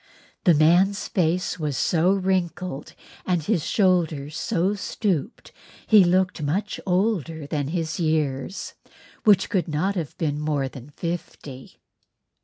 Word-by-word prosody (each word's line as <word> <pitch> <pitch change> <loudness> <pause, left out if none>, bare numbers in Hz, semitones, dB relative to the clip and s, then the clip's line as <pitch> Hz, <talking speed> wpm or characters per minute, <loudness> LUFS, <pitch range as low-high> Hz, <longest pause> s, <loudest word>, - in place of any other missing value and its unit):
The 175 -4 +6
man's 175 +6 +3
face 180 0 0
was 150 -4 -2
so 175 +2 +2
wrinkled 185 -5 -2 0.3
and 175 -4 0
his 185 -3 0
shoulders 160 -8 +1
so 185 +4 0
stooped 200 - -3 0.3
he 215 -3 +7
looked 185 +1 +1
a - - -5
much 185 +9 -2
older 180 -3 +1
man 145 - -8
than 145 -3 -1
his 160 0 -3
years, 155 -1 -1 0.5
which 200 -3 +4
could 190 -4 0
not 165 +6 0
have 165 -7 -5
been 150 -3 -1
more 150 -3 -1
than 130 +1 -11
fifty. 150 -5 -7
170 Hz, 135 wpm, -24 LUFS, 150-190 Hz, 0.5 s, he